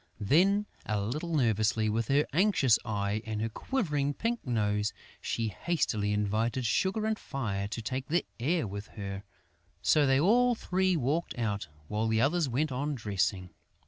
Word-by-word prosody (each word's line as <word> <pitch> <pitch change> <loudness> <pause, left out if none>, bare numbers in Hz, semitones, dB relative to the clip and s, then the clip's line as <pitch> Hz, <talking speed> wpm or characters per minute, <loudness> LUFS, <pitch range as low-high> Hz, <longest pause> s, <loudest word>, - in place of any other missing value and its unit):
Then, 185 - +3 0.2
a 105 -1 0
little 150 +11 -2
nervously, 110 -4 +2
with 110 +1 -1
an 145 +2 +4
anxious 160 - +4
eye 105 -2 -1
and 110 -2 -4
a 115 +1 -1
quivering 145 - -1
pink 235 +1 -2
nose, 105 -3 0 0.3
she 115 -1 -1
hastily 105 - -1
invited 110 +4 0
Sugar 190 - +1
and 220 0 0
Fire 105 -8 -3
to 115 +2 -5
take 130 +4 -3
the 170 +3 +1
air 155 +6 +1
with 100 +1 -6
her. 100 -1 -5 0.6
So 150 -2 +4
they 135 0 +4
all 240 +9 +4
three 185 -3 +1
walked 150 +4 -1
out, 105 -6 -2 0.2
while 110 +2 -1
the 110 0 +2
others 150 +4 +2
went 140 +5 0
on 145 +3 -2
dressing. 95 -5 -1
120 Hz, 160 wpm, -30 LUFS, 105-160 Hz, 0.6 s, an